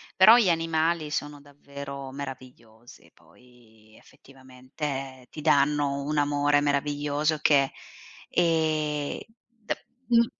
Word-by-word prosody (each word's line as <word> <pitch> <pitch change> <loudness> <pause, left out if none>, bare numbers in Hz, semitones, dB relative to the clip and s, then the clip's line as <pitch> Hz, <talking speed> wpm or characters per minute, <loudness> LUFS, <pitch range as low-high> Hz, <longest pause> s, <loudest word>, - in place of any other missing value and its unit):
Però 220 +5 +8
gli 210 -7 +3
animali 165 -1 0
sono 145 -1 -4
davvero 140 -1 -9
meravigliosi, 130 -4 -11
poi 110 -3 -23
effettivamente 130 0 -8
ti 155 - -9
danno 145 -2 +2
un 150 +1 -2
amore 145 0 +2
meraviglioso 145 +1 0
che 140 -3 +3 0.6
ehm, 155 -3 0 0.3
de 230 -2 -7 0.2
mh 235 -1 +5
145 Hz, 100 wpm, -26 LUFS, 135-155 Hz, 0.6 s, Però